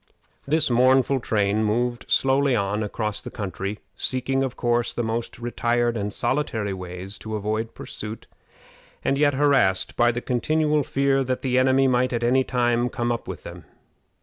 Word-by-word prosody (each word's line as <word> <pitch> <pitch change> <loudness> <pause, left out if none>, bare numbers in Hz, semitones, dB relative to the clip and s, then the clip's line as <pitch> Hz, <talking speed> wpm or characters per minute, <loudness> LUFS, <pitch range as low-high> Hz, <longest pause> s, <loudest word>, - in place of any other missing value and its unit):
] - - -38
This 160 -5 +2
mournful 130 +2 +4
train 105 -2 +1
moved 120 +3 -1
slowly 135 0 +3
on 100 0 0
across 105 0 -2
the - - -7
country, 100 +1 -4 0.2
seeking, 130 +1 -1
of 130 -2 -2
course, 120 -1 0
the 120 - -2
most 115 +1 -3
retired 120 0 0
and 105 -1 -2
solitary 110 -6 -1
ways 90 +2 -6
to 110 0 -5
avoid 110 +2 -2
pursuit, 105 +1 -7 0.8
and 135 - +2
yet 145 0 +2
harassed 135 -10 +2
by 120 0 +4
the 120 - -3
continual 150 +5 +1
fear 135 0 +1
that 130 0 -2
the 130 -1 +2
enemy 130 +1 +4
might 125 0 +2
at 120 0 -1
any 130 +2 +3
time 120 -1 +1
come 120 -1 -2
up 115 - -3
with - - -7
them. - - -10
120 Hz, 170 wpm, -24 LUFS, 110-130 Hz, 0.8 s, mournful